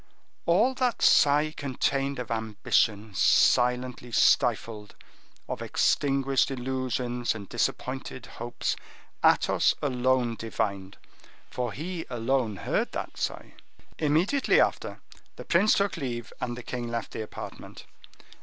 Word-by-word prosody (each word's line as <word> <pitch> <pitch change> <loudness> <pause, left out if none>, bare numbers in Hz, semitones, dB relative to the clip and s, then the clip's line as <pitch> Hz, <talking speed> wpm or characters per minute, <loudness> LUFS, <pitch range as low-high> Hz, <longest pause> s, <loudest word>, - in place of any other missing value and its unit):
All 210 +10 +4
that 255 -3 -1
sigh 150 +2 +5
contained 140 0 -1
of 125 -1 -5
ambition 110 -1 0
silently 125 +4 +2
stifled, 115 -3 +2 0.5
of - - -5
extinguished 135 -1 +1
illusions 125 -2 -2
and 100 -3 -8
disappointed 130 0 -3
hopes, 120 +1 -4 0.5
Athos - - +4
alone 125 -3 +1
divined, 100 -3 -3 0.5
for 125 -2 -2
he 170 +5 -5
alone 120 -2 0
heard - - -2
that - - -5
sigh. - - -4 0.5
Immediately 165 - +2
after, - - 0 0.3
the - - -9
prince 190 +5 +4
took 200 -2 +1
leave 120 -5 -5
and 120 -1 -3
the 125 - -8
king 120 0 -4
left 115 0 -4
the - - -5
apartment. 110 - -9
125 Hz, 115 wpm, -27 LUFS, 115-140 Hz, 0.5 s, sigh